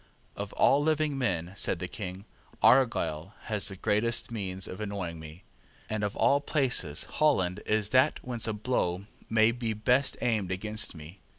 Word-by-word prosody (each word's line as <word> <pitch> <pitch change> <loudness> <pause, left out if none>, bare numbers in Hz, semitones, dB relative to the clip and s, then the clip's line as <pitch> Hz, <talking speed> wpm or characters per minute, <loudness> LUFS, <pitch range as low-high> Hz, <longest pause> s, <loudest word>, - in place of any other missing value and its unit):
"Of 100 0 -5
all 140 - +4
men - - -2
living," 135 - 0
said 95 - +1
the 90 - -4
King, 95 +1 -7 0.4
"Argyle 100 - +3
has 105 -3 +1
the 100 - -4
greatest 110 +5 0
means 95 -4 -3
of 95 - -7
annoying 95 -6 -4
me; 80 +3 -11 0.5
and 110 -1 -1
of 105 0 -2
all 140 +1 +3
places 125 - +1
Holland 95 -13 +1
is 105 -1 +1
that 130 +2 +3
whence 120 -3 -1
a 110 - -1
blow 100 -4 -1 0.2
may 110 0 +4
be 115 -2 -3
best 125 +6 +1
aimed 110 -6 0
against 105 +2 -2
me." 80 +5 -11
105 Hz, 165 wpm, -29 LUFS, 90-120 Hz, 0.5 s, all